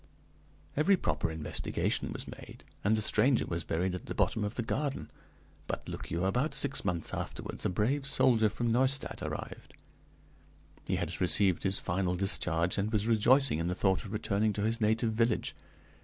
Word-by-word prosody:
"Every 185 +7 +3
proper 80 - -1
investigation 80 -1 -2
was - - -5
made, - - -11 0.2
and 110 +2 +2
the 110 - 0
stranger 120 +5 +4
was 85 -1 -4
buried 90 +3 -1
at 90 - -7
the - - -5
bottom 110 - 0
of 105 +2 -3
the 120 - -2
garden. 130 - -3 0.6
But, - - -5
look - - -7
you, 85 +2 -1
about 125 +11 0
six - - -1
months 85 -2 -2
afterwards - - -4
a - - -1
brave 130 +9 0
soldier 115 -5 +4
from 115 +2 -2
Neustadt 130 +3 +1
arrived; - - -7 1.1
he - - 0
had - - -4
received 90 +1 +4
his 95 0 +2
final 90 0 -1
discharge, 90 -2 +1
and 105 +2 -1
was 105 -2 0
rejoicing 120 - +4
in 85 - -1
the 90 - -1
thought 95 -1 +1
of 100 - -9
returning 105 0 0
to 100 - -3
his 115 +2 -1
native 110 +2 +1
village. 115 0 0
105 Hz, 175 wpm, -30 LUFS, 90-120 Hz, 1.1 s, stranger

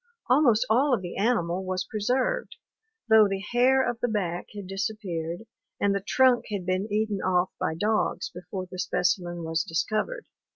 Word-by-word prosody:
Almost 255 -4 +4
all 255 +4 +3
of 195 - -6
the 175 - -6
animal 190 -5 0
was 185 0 -2
preserved, 260 - -1 0.5
though 220 -2 +7
the 195 0 -3
hair 260 +2 +4
of 240 -1 -2
the 245 - 0
back 180 -6 -2
had 205 -2 -6
disappeared 190 -3 -4 0.4
and 200 0 +2
the 200 - -1
trunk 255 +4 +3
had 200 -4 -3
been 185 +3 -1
eaten 210 -2 0
off 185 0 +1
by 160 - -1
dogs 215 +5 0
before 185 +2 -6
the 185 0 -10
specimen 175 -1 0
was 160 -1 0
discovered. 215 - -2
200 Hz, 165 wpm, -26 LUFS, 180-230 Hz, 0.5 s, though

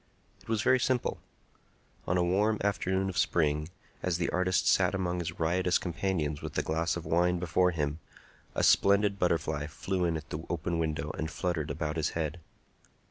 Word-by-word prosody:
It - - -17
was 110 -1 +1
very 130 0 +4
simple. 125 0 0 0.9
On 90 - +2
a 90 - +3
warm 105 +5 +2
afternoon 95 -1 0
of 95 - -2
spring, 75 -1 +1 0.3
as 90 -2 0
the 85 - -1
artist 90 0 +1
sat - - +4
among 90 -2 -1
his 85 0 -5
riotous 90 +2 +2
companions 85 -4 -2
with - - -6
a - - +1
glass 80 +2 0
of 85 - -7
wine 90 +1 +2
before 90 +1 +2
him, 75 -3 -2 0.6
a - - 0
splendid 100 0 +4
butterfly 80 -4 0
flew 90 +4 -2
in 85 -1 0
at 75 -1 -10
the 75 +1 -4
open 85 0 -1
window 80 -2 -1
and 80 - -2
fluttered 80 -2 -2
about 75 +1 -3
his 80 - +1
head. 80 +1 -2
85 Hz, 180 wpm, -30 LUFS, 80-95 Hz, 0.9 s, very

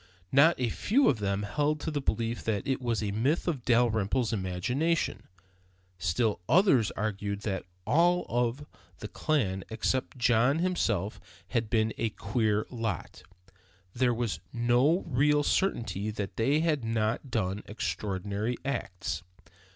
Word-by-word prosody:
Not 145 +4 +5
a 125 -2 +1
few 255 - +2
of 125 - +1
them 100 0 -1
held 150 +8 0
to 160 - -3
the 145 -2 -2
belief 115 -1 -1
that 105 -3 -1
it 135 -1 0
was 115 -3 -1
a 100 - -1
myth 130 - 0
of 145 -8 -1
Dalrymple's 120 -1 +2
imagination. 125 - -1 0.7
Still, 100 +6 0
others 160 - +5
argued, 100 -1 -3 0.4
all 175 +3 +3
of 120 +4 -1 0.3
the - - -6
clan 100 -12 -1
except 125 +4 -1
John 120 +3 +3
himself 115 - 0 0.3
had 115 -3 -1
been 110 -1 +1
a 115 - +1
queer 105 0 0
lot; 115 -8 -4 0.7
there 125 0 +2
was 120 -3 -2
no 120 +8 +2
real 145 +1 +3
certainty 115 - 0
that 105 -2 -4
they 140 +7 +2
had 155 -6 +1
not 115 +3 -1
done 95 -3 -1
extraordinary 105 +2 -3
acts. 95 - -3
115 Hz, 135 wpm, -29 LUFS, 105-140 Hz, 0.7 s, Not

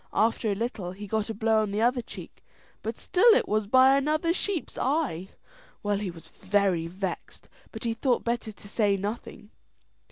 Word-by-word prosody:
After 220 0 +2
a - - 0
little 200 -5 -3
he 205 +2 -8
got 215 +2 -1
a - - -2
blow 220 +1 +2
on 215 - -1
the 205 +2 -1
other 245 +1 +2
cheek, - - -11 0.4
and - - -3
still 440 +5 +5
it - - +2
was 215 -1 0
by 260 +4 +6
another 310 +4 +1
sheep's 375 -2 -3
eye. 255 - -1 0.5
Well, 205 -1 0
he 205 -2 -3
was 170 -2 -10
very 190 -4 0
vexed, 185 +1 -6 0.2
but 220 - -8
he 230 -1 0
thought 245 +1 0
better 235 -2 -2
to 205 - -14
say 205 -1 +1
nothing. 210 +1 -6
220 Hz, 185 wpm, -27 LUFS, 200-245 Hz, 0.5 s, by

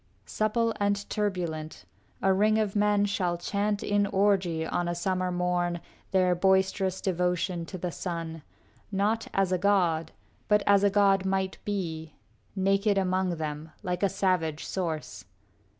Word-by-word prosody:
VII 95 +1 -38
Supple 215 - 0
and 200 0 0
turbulent, 175 -7 -3 0.4
a 195 - +4
ring 215 +3 +3
of 215 -2 0
men 205 0 +3
Shall 185 -4 -1
chant 205 +3 -1
in 205 0 +2
orgy 190 -5 +1
on 175 +1 -1
a 175 - -1
summer 185 0 -1
morn 175 -1 0 0.3
Their 185 -2 +3
boisterous 190 +1 +1
devotion 180 -1 -1
to 185 - -6
the 180 0 -3
sun, 165 -2 -5 0.5
Not 210 +3 0
as 195 -1 +1
a 185 - +1
god, 175 -5 +2 0.4
but 210 -1 +3
as 200 0 +5
a 200 - +5
god 195 -1 +3
might 190 0 -1
be, 165 -6 -4 0.4
Naked 195 +1 +2
among 185 -1 +1
them, 155 0 -5
like 180 -2 -2
a 200 - +3
savage 180 -6 0
source. 155 - -4
190 Hz, 150 wpm, -28 LUFS, 175-200 Hz, 0.5 s, as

